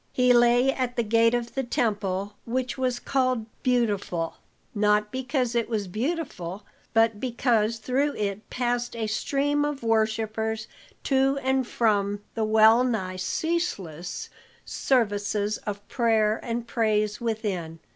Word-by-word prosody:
He 250 -1 +4
lay 240 +2 +4
at 250 -2 -2
the 235 - +1
gate 230 +2 +3
of 235 -1 -3
the 270 - 0
temple, 205 -6 -1
which 250 +2 -2
was 255 -2 0
called 255 -3 0 0.2
"Beautiful," 205 -9 0 0.4
not 210 0 +2
because 255 -2 -1
it 235 -1 0
was 210 -4 -1
beautiful, 215 - -3 0.3
but 225 -1 +3
because 235 -3 +1
through 265 +6 0
it 205 0 -3
passed 240 -1 -1
a 225 -1 -2
stream 285 +7 0
of 290 -3 -3
worshippers 220 0 0 0.4
to 270 0 +2
and 265 -1 +1
from 205 -4 +1
the 225 - -1
well 220 +2 +6
nigh 190 -7 -2
ceaseless 190 - -3 0.3
services 210 -4 0
of 205 0 -5
prayer 220 -3 +2
and 235 0 -3
praise 215 -2 0
within. 205 -8 -3
230 Hz, 130 wpm, -26 LUFS, 210-250 Hz, 0.4 s, well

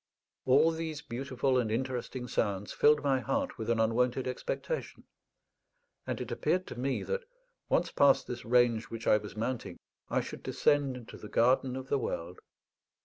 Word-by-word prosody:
All 145 +6 +6
these 160 -2 -4
beautiful 130 0 0
and 115 -3 0
interesting 125 +1 -3
sounds 100 -3 -1
filled 150 0 +4
my 135 -2 +2
heart 280 - -2
with 110 - -3
an 115 -1 +2
unwonted 125 +3 +1
expectation; 480 - -4 1.0
and - - -2
it - - -5
appeared 185 0 0
to - - -7
me 135 +1 -1
that, 480 0 -2 0.5
once - - +2
past 140 -1 +4
this 120 -1 -6
range 120 -1 +3
which 115 0 -7
I - - +5
was 105 0 -8
mounting, 120 +2 -3 0.3
I - - +1
should - - -8
descend 140 -3 +1
into 120 -2 -10
the 105 - -10
garden 125 +2 +3
of 130 0 -6
the 140 - +2
world. 90 -6 -4
125 Hz, 165 wpm, -31 LUFS, 115-140 Hz, 1.0 s, All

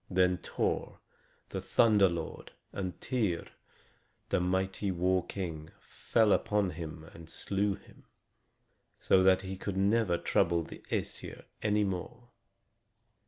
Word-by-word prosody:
Then 90 -1 +3
Thor, - - -2 0.5
the - - -4
thunder 105 -4 +4
lord, 85 -2 -6 0.2
and 95 -2 -4
Tŷr, 105 -10 -1 0.8
the - - +2
mighty 95 +2 0
war 90 0 +1
king, 80 -5 -5
fell 110 -3 +1
upon 105 -3 +1
him 80 -2 -7
and 80 -1 -12
slew 100 +2 0
him, - - -19 0.9
so 95 - +4
that 95 0 +5
he 95 0 -4
could 95 0 -4
never 100 -2 +3
trouble 85 0 +2
the - - -10
Æsir - - -3 0.2
any 105 0 +2
more. 100 +5 -4
95 Hz, 120 wpm, -31 LUFS, 90-100 Hz, 0.9 s, that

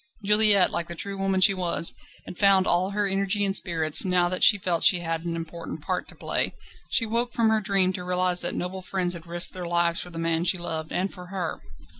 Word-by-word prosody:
Juliette, 210 -2 +5
like 170 - -3
the 170 - -7
true 200 +4 -5
woman 195 -1 -1
she 195 +1 +7
was, 175 -2 -1 0.3
had - - -11
found 195 -2 +3
all 180 +2 +1
her 205 +1 -2
energy 195 +1 0
and 195 0 -1
spirits 160 -5 +4
now 180 -2 0
that 185 - -2
she 205 - +7
felt 180 -3 -2
that - - +7
she 180 -2 +3
had 165 -1 -4
an 170 -1 -4
important 165 -2 -8
part 185 0 -4
to - - -13
play. - - -2 0.3
She 230 - +1
woke 235 +2 -2
from 230 -1 +1
her 220 -1 +1
dream 195 -2 0
to 180 - -6
realise 180 0 0
that 175 - -3
noble 185 +1 -5
friends 185 -1 -1
had 170 -1 -10
risked 175 +1 0
their 180 -2 -7
lives 170 0 0
for 180 - -9
the 165 - -11
man 165 0 -1
she 185 - +2
loved 160 -2 -5
and 190 +2 -3
for 180 -2 -12
her. 180 -3 -6
180 Hz, 240 wpm, -24 LUFS, 170-195 Hz, 0.3 s, she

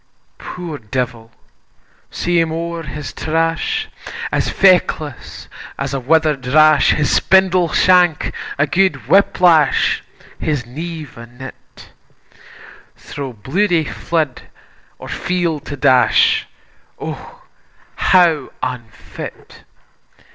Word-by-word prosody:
Poor 170 -5 -7
devil! 115 0 -4 0.8
see 175 0 0
him 165 -1 0
owre 170 +1 -4
his 150 0 -7
trash, 165 - -1 0.4
As - - 0
feckless 175 -7 +1 0.3
as 140 0 -4
a 135 - -1
wither'd 150 -1 +1
rash, 155 +3 +5
His 150 -2 0
spindle 185 -2 +3
shank 180 -2 +3 0.2
a 140 - +3
guid 170 - 0
whip 195 +7 +3
lash, 165 -5 +3 0.4
His 145 -7 -2
nieve 155 +1 -8
a 115 - -10
nit; 125 +3 -13 1.1
Thro' 140 -2 -7
bloody 165 - 0
flood 155 -3 -2 0.6
or - - -10
field 170 -4 -2
to 145 - -6
dash, 130 -1 +3 0.5
O - - -8 0.5
how 170 -6 +3
unfit! 120 -4 -8
155 Hz, 100 wpm, -17 LUFS, 130-175 Hz, 1.1 s, rash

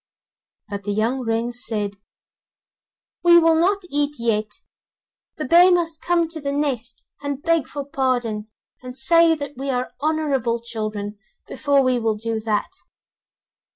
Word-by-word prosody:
But 200 -1 -5
the 205 0 -3
young 225 +5 0
wrens 240 0 -2
said: 205 -3 -3 1.2
'We 345 0 +7
will 330 -1 +5
not 375 +5 +2
eat 290 -2 0
yet, 225 - -1 0.7
the 305 - -3
bear 345 +6 +7
must 330 -3 0
come 345 -1 +2
to 325 -2 -7
the 280 0 -2
nest, 280 -4 -2 0.2
and 285 0 -4
beg 330 -4 +2
for 285 -1 -5
pardon 245 -7 -1 0.3
and 255 0 -9
say 330 +4 +4
that 285 -2 -6
we 275 +1 -4
are 250 -1 -1
honourable 285 -7 0
children, 215 -3 -4 0.3
before 285 -2 +2
we 255 -1 +2
will 225 -2 0
do 225 +1 -3
that. 215 -1 -1
265 Hz, 145 wpm, -22 LUFS, 225-315 Hz, 1.2 s, We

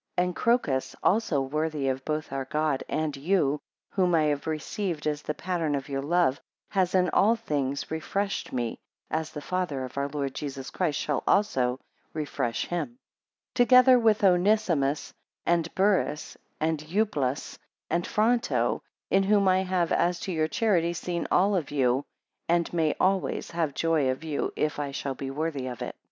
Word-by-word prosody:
7 180 0 +2
And 180 - -7
Crocus 230 - +1
also 185 -8 +2
worthy 150 +1 -1
of 130 0 -1
both 155 0 -3
our 135 -1 -2
God 150 -1 0
and 155 -2 -1
you, 150 -1 +1 0.3
whom 180 -3 +2
I 160 - +4
have 145 -1 0
received 160 +2 -3
as 150 -1 -1
the 150 - -4
pattern 165 -4 -1
of 140 +1 -4
your 135 -1 -2
love, 160 -2 +2 0.3
has 190 -2 +1
in 180 -1 +4
all 220 +4 +4
things 145 - -2
refreshed 195 +5 -2
me, 120 -3 -2 0.3
as 160 0 -1
the 150 -1 -8
Father 175 -8 -2
of 130 +2 -6
our 140 - 0
Lord 140 -2 -3
Jesus 135 -2 -5
Christ 160 -6 0
shall 145 -3 -1
also 130 -12 +2 0.4
refresh 140 -6 -2
him; 175 +8 -3 0.6
together 255 0 +6
with 220 -3 +3
Onesimus, 180 -6 +2 0.3
and 170 -1 +2
Burrhus, 190 -6 +1 0.2
and 160 0 0
Euplus, 155 -5 -1 0.3
and 170 0 -1
Fronto, 230 +3 +1 0.3
in 195 - +5
whom 200 0 +3
I 185 0 +4
have, 180 -3 0
as 175 0 +2
to 190 - -3
your 160 -2 +1
charity, 175 -5 +1
seen 170 0 -3
all 200 +2 +3
of 170 -6 -1
you, 135 -1 +1 0.4
And 170 0 +1
may 160 -3 +1
always, 190 0 0
have 165 -5 -1
joy 160 -5 +2
of 130 +4 -2
you, 155 -3 -2
if 150 -1 -1
I 145 -1 -2
shall 135 0 -3
be 135 +1 -5
worthy 145 -2 -3
of 125 -2 -5
it. - - -6
160 Hz, 170 wpm, -27 LUFS, 140-185 Hz, 0.6 s, together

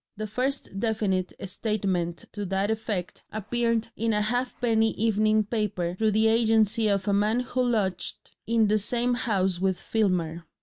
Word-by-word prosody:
The 215 - -3
first 250 -1 -3
definite 205 -5 0 0.2
statement 185 -4 -2
to 205 - -5
that 195 +3 0
effect 210 -5 -3
appeared 230 +2 -1
in 225 0 0
a 210 - +2
halfpenny 230 -1 +1
evening 215 0 +2
paper 205 -5 -2
through 220 +4 +1
the 220 +1 +3
agency 225 -1 +3
of 200 -1 0
a 200 - +2
man 210 +4 +2
who 250 +1 -2
lodged 205 -8 -1 0.2
in 230 -1 +3
the 215 +1 +3
same 240 +4 0
house 190 -7 0
with 190 -1 +1
Filmer. 175 -6 -1
215 Hz, 150 wpm, -26 LUFS, 195-230 Hz, 0.2 s, the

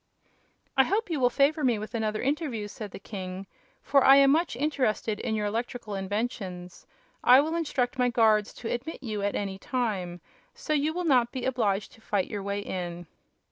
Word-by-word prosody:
"I 265 - +6
hope 410 +1 -1
you 310 - 0
will 245 -1 +4
favor 290 +4 +2
me 245 -4 +3
with 215 +2 -7
another 215 -2 -1
interview," 270 -7 -1
said 210 0 -7
the - - -9
king, 190 -1 -7 0.4
"for 275 -2 +4
I 270 - +8
am 275 0 +6
much 325 -2 +1
interested 250 -6 0
in 220 - -2
your 210 -1 -1
electrical 225 0 -3
inventions. 195 -3 -4 0.4
I 250 +2 +8
will 310 +3 0
instruct 265 -6 -1
my 250 0 +3
guards 220 -3 +3
to 230 - -4
admit 260 +7 -5
you 215 -4 -3
at 200 0 -1
any 195 -1 -3
time, 195 -10 -2 0.4
so 305 - -3
you 300 +1 +1
will 355 +2 -3
not 250 -6 +3
be 255 - -4
obliged 215 -6 0
to 225 - -19
fight 205 -4 -1
your 205 -2 -3
way 200 +1 -3
in." 175 -3 -5
230 Hz, 190 wpm, -27 LUFS, 205-270 Hz, 0.4 s, I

